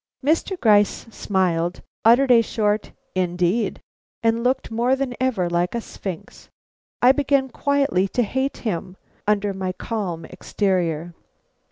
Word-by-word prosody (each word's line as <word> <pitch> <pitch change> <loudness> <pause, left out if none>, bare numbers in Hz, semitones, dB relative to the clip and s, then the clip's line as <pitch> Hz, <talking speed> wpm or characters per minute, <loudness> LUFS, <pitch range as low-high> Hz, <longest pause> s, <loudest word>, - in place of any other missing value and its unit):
Mr. 330 +5 +1
Gryce 210 -2 +3
smiled, 180 -4 -1 0.2
uttered 250 +4 +5
a 235 -1 +7
short 210 -1 -1 0.2
"Indeed!" 180 +4 0 0.4
and 230 +1 +2
looked 255 -1 0
more 240 +3 +2
than 265 -2 -2
ever 240 -9 +1
like 175 +3 0
a - - 0
sphinx. 185 -6 -8 0.5
I 250 - +8
began 275 -1 +1
quietly 275 -8 +1
to 245 +5 0
hate 265 +5 -2
him, 185 -2 -3 0.3
under 205 -1 +1
my 190 -1 -3
calm 185 -7 -4
exterior. 175 -4 -1
210 Hz, 130 wpm, -22 LUFS, 185-250 Hz, 0.5 s, I